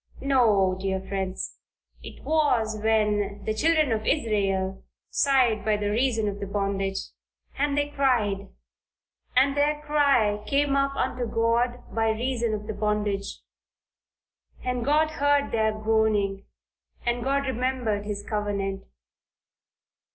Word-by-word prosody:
No, 215 -9 +3
dear 190 -1 -1
friends, 190 -1 -4 0.4
it - - -11
was 250 -9 +1
when 210 -2 +1
"the 215 - 0
children 310 +3 +2
of 220 -1 -1
Israel 195 -8 0 0.3
sighed 250 -7 +3
by 215 0 +2
reason 220 +2 0
of 200 0 -3
the 200 - -4
bondage, 195 -1 -1 0.6
and 285 0 0
they 290 0 +1
cried, 230 -9 +1 0.9
and 275 +2 +4
their 295 +1 +2
cry 275 -9 +2
came 280 +1 +2
up 275 0 +1
unto 245 -3 -1
God 235 +2 0
by 225 0 +1
reason 235 0 -1
of 210 0 -7
the 220 - -4
bondage. 205 -1 -2 1.2
And 250 -1 -1
God 305 +3 +2
heard 285 -1 +1
their 220 -1 +2
groaning 215 -2 0 0.6
and 240 0 0
God 275 +1 0
remembered 250 -5 -1
his 205 -1 -4
covenant." 200 -2 -2
220 Hz, 120 wpm, -26 LUFS, 205-270 Hz, 1.2 s, and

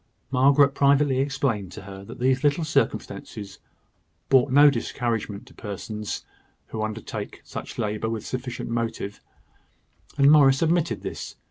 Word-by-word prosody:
Margaret 140 +2 +5
privately 140 -1 +3
explained 125 -8 -1
to 105 - -9
her 95 0 -9
that - - -10
these 130 +2 +1
little 145 +3 +2
circumstances 105 - -2 0.7
brought 135 0 +4
no 145 +2 +7
discouragement 115 -3 -3
to - - -17
persons 105 +1 -6 0.4
who 110 - -4
undertake 110 0 -5
such - - -8
labour 105 +1 -1
with 110 -1 -4
sufficient 125 -2 -5
motive; 115 -3 -3 1.0
and 140 0 +6
Morris 135 -1 +6
admitted 165 0 +1
this. - - -6
125 Hz, 130 wpm, -25 LUFS, 110-140 Hz, 1.0 s, no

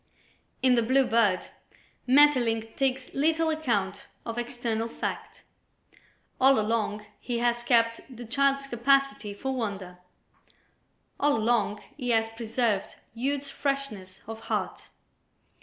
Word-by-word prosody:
In 255 -1 +5
"The 240 - +4
Blue 260 +4 +3
Bird" 225 -6 +2 0.6
Maeterlinck 245 -5 +4
takes 265 -1 -1
little 320 +3 +2
account 225 -11 -1 0.2
of 230 0 -3
external 235 -2 -2
fact. - - -6 1.0
All 265 -1 +5
along 215 -1 -1
he 240 -2 -3
has 240 0 +1
kept 230 -1 +2
the 245 -2 -9
child's 275 +3 +1
capacity 275 -2 +1
for 265 +6 -3
wonder; 195 -6 -4 1.2
all 290 -2 +3
along 215 -2 +1
he 250 -4 -4
has 225 -1 +2
preserved 225 -2 -1 0.2
youth's 275 +4 -2
freshness 275 -10 -4
of 225 0 -7
heart. 225 - -4
240 Hz, 115 wpm, -27 LUFS, 225-270 Hz, 1.2 s, In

